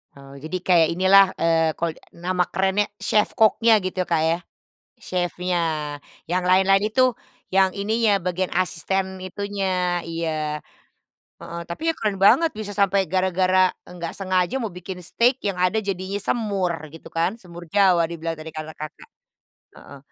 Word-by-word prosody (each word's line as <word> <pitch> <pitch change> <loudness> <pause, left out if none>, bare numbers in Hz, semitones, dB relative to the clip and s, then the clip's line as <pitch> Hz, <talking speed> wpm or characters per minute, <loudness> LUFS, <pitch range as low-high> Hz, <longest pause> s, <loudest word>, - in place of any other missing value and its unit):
Oh 140 0 -13
jadi 155 +6 -5
kayak 170 -3 +4
inilah, 190 +3 +6
eee, 165 -1 +3
kalo 165 -2 -1
e - - -21 0.2
nama 180 +1 0
kerennya 190 +3 +1 0.2
chef 210 -1 +2
cook-nya 220 0 +4
gitu, 185 -1 -2
Kak, 170 -2 0
ya, 165 +1 +2 0.6
chef-nya, 180 0 -2 0.7
yang 180 +1 0
lain-lain 190 +2 +4
itu 255 -1 +3 0.3
yang 190 0 +3
ininya, 205 0 +1
bagian 180 +1 -2
asisten 185 +1 -1
itunya, 185 -3 -2
iya. 155 -2 -3 0.8
Heeh, 170 0 -7
tapi 245 - -4
ya 330 - +2
keren 205 -3 -2
banget 325 +11 +5
bisa 210 -1 -6
sampai 200 -2 +2
gara-gara 185 +1 +2 0.2
nggak 170 -2 -6
sengaja 185 +6 0
mau 225 - -2
bikin 180 0 -8
steak, 240 +9 +1
yang 200 -3 -2
ada 180 +4 +1
jadinya 195 0 -3
semur 200 -5 -1 0.2
gitu 160 - -12
kan, 185 +8 -1
semur 175 -1 -11
Jawa 185 -4 +4
dibilang 165 0 -4
tadi 155 0 -9
kata 155 0 -6
Kakak, 155 0 -9 0.7
heeh. 140 - -13
185 Hz, 150 wpm, -23 LUFS, 170-200 Hz, 0.8 s, inilah